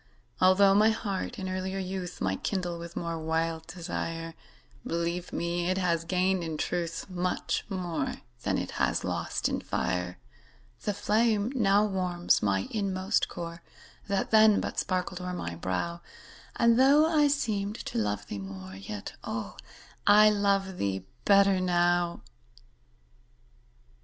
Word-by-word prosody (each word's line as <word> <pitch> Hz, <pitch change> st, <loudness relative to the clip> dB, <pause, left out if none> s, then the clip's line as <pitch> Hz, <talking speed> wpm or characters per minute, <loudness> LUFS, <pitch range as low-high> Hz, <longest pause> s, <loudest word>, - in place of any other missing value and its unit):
Altho' 190 Hz, +1 st, +6 dB
my 210 Hz, +2 st, +5 dB
heart 220 Hz, +1 st, -3 dB
in 190 Hz, -3 st, -4 dB
earlier 185 Hz, +1 st, -3 dB
youth 185 Hz, -2 st, -5 dB
Might 95 Hz, 0 st, -1 dB
kindle 180 Hz, -4 st, -2 dB
with 170 Hz, 0 st, -8 dB
more 170 Hz, -1 st, -3 dB
wild 160 Hz, 0 st, -1 dB
desire, 165 Hz, -1 st, -4 dB, 0.5 s
Believe 170 Hz, +1 st, -2 dB
me, 170 Hz, +1 st, -1 dB
it 185 Hz, -, +1 dB
has 170 Hz, -3 st, 0 dB
gained 185 Hz, +1 st, +1 dB
in 160 Hz, -2 st, -4 dB
truth 170 Hz, 0 st, -2 dB
Much 180 Hz, -1 st, -1 dB
more 175 Hz, -7 st, -2 dB, 0.3 s
than -, -, 0 dB
it -, -, -3 dB
has -, -, +1 dB
lost -, -, -1 dB
in -, -, -2 dB
fire. 90 Hz, 0 st, -2 dB, 0.7 s
The 205 Hz, -, 0 dB
flame 215 Hz, +2 st, +2 dB
now 205 Hz, -4 st, +4 dB
warms 180 Hz, -3 st, +1 dB
my 95 Hz, -2 st, +1 dB
inmost 195 Hz, -1 st, 0 dB
core, 170 Hz, -1 st, -7 dB, 0.5 s
That 200 Hz, -1 st, -1 dB
then 220 Hz, -1 st, +6 dB
but -, -, -3 dB
sparkled 180 Hz, -1 st, -2 dB
o'er 180 Hz, 0 st, -4 dB
my 85 Hz, -, -4 dB
brow, 95 Hz, -, -3 dB, 0.5 s
And, 235 Hz, 0 st, +4 dB
though 280 Hz, +4 st, +6 dB
I 310 Hz, -2 st, +4 dB
seemed 215 Hz, -8 st, -1 dB
to -, -, -2 dB
love 105 Hz, -1 st, -1 dB
thee 100 Hz, -, -6 dB
more, 95 Hz, -1 st, -8 dB
Yet, 100 Hz, +1 st, -7 dB
oh, -, -, -4 dB, 0.5 s
I 210 Hz, +1 st, +8 dB
love 200 Hz, -2 st, +1 dB
thee 95 Hz, -1 st, -1 dB, 0.2 s
better 200 Hz, -1 st, +5 dB
now. 175 Hz, -1 st, +1 dB
180 Hz, 140 wpm, -29 LUFS, 165-200 Hz, 0.7 s, I